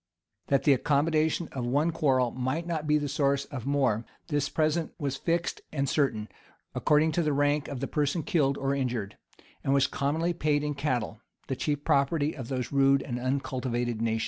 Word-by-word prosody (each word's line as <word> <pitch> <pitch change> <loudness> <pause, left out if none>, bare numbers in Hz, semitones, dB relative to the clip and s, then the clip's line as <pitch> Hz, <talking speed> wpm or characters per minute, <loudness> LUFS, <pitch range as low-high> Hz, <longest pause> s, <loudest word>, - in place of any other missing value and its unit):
That 140 - +2
the 145 - +6
accommodation 155 +4 +1
of 130 - -4
one 145 +7 +1
quarrel 130 -6 +2
might 130 +6 -2
not 160 -3 -3
be 150 0 +4
the 145 -1 -2
source 140 -1 +1
of 130 -2 -7
more, 130 -6 +1 0.3
this 145 -2 0
present 155 +1 0
was 140 -4 -2
fixed 170 +5 -1
and 140 -2 -1
certain 125 -7 0 0.5
according 155 +1 +3
to 170 - +1
the 155 -3 +1
rank 145 +1 +1
of 135 -3 -5
the 135 - -1
person 150 +2 0
killed 145 -9 +1
or 135 0 0
injured, 125 -7 -2 0.5
and 135 - +2
was 140 0 +4
commonly 160 +6 0
paid 150 -3 +1
in 150 0 -1
cattle, 125 -7 -2 0.2
the 135 - -3
chief 145 +2 -2
property 145 +2 +2
of 130 -5 -6
those 125 -2 -3
rude 135 -1 +4
and 120 -2 -4
uncultivated 125 -3 -2
nations. 115 -1 0
140 Hz, 185 wpm, -28 LUFS, 130-150 Hz, 0.5 s, the